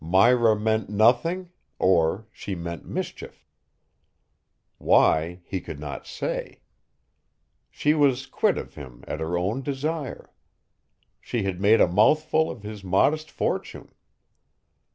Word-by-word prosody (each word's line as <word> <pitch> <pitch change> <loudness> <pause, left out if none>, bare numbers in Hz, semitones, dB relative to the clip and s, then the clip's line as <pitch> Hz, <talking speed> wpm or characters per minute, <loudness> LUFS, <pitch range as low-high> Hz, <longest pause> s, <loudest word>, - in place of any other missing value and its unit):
Myra 110 +5 +4
meant 110 -1 0
nothing 165 - +2 0.3
or 95 +3 +2
she 100 - -6
meant 85 -1 -7
mischief. - - -6 1.3
Why, 85 +3 +3
he 95 -2 -4
could 70 - -8
not 70 -3 -7
say. - - -5 1.1
She 150 - +1
was 135 -4 +2
quit - - 0
of - - -7
him 65 -4 -11
at 75 - -4
her 80 +2 -2
own 100 +9 -1
desire. 145 +2 -4 0.9
She 120 -4 -3
had 95 -1 -3
made 110 +3 +5
a - - +6
mouthful 155 - +3
of 115 - -8
his 105 -1 -8
modest 145 +12 +1
fortune. - - -4
105 Hz, 120 wpm, -25 LUFS, 90-135 Hz, 1.3 s, a